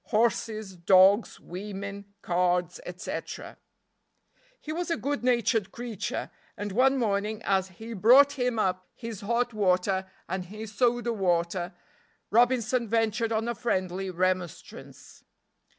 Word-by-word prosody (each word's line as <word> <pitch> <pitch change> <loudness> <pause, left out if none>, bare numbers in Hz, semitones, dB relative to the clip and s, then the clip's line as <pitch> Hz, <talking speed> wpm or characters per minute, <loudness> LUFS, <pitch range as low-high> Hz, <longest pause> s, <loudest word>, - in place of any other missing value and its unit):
Horses, 215 -3 0
dogs, 190 +5 +5
women, 200 +1 -7
cards, 180 - +1
etc. - - -6 1.0
He 310 - -6
was 350 +2 -3
a 335 - +1
good 285 -1 -2
natured 235 -4 +2
creature, 240 -5 -4 0.3
and 205 0 -4
one 265 +6 +3
morning 210 -2 0
as 190 -1 +1
he 220 +5 -9
brought 250 +8 +6
him 250 -4 -1
up 185 -3 -1
his 230 -4 -7
hot 235 +3 0
water 190 -1 +1 0.2
and 185 0 -3
his 215 +3 -8
soda 240 +1 +1
water 175 -2 0 0.6
Robinson 240 +1 +3
ventured 225 +1 +1
on 225 +1 0
a 235 - 0
friendly 190 -5 -2
remonstrance. 185 -1 -4
210 Hz, 120 wpm, -28 LUFS, 185-235 Hz, 1.0 s, brought